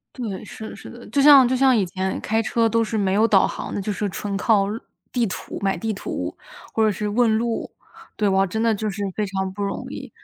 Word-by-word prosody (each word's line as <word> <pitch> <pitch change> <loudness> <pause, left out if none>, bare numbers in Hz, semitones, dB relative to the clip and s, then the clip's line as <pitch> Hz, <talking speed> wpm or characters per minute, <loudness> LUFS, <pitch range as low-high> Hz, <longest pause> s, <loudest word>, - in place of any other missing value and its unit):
对， 220 -7 -5
是 220 +1 -8
的 - - -10
是 - - -11
的。 240 0 -12
就 280 - +2
像 275 -3 +9
就 255 +1 +1
像 265 -1 +4
以 205 - +2
前 190 +2 -3
开 220 +1 0
车 230 0 +1
都 230 0 +2
是 220 0 -2
没 195 -2 +1
有 215 +3 +4
导 205 -4 +4
航 - - -5
的 - - -2
就 210 +2 -2
是 205 +1 -2
纯 200 +1 -4
靠 205 -1 +3 0.5
地 240 -2 +1
图， 180 -5 -6
买 195 -1 0
地 225 -1 -2
图 200 - -5 0.4
或 220 - +2
者 215 - +4
是 210 +1 -3
问 225 0 +3
路。 230 0 -2 0.5
对， 210 -2 +1
哇 195 0 +3
真 220 +5 -3
的 225 -1 +3
就 215 +1 -2
是 200 +1 -5
非 210 - -1
常 190 -1 -3
不 205 +1 -5
容 200 - -3
易。 - - -7
215 Hz, 265 characters per minute, -22 LUFS, 195-230 Hz, 0.5 s, 像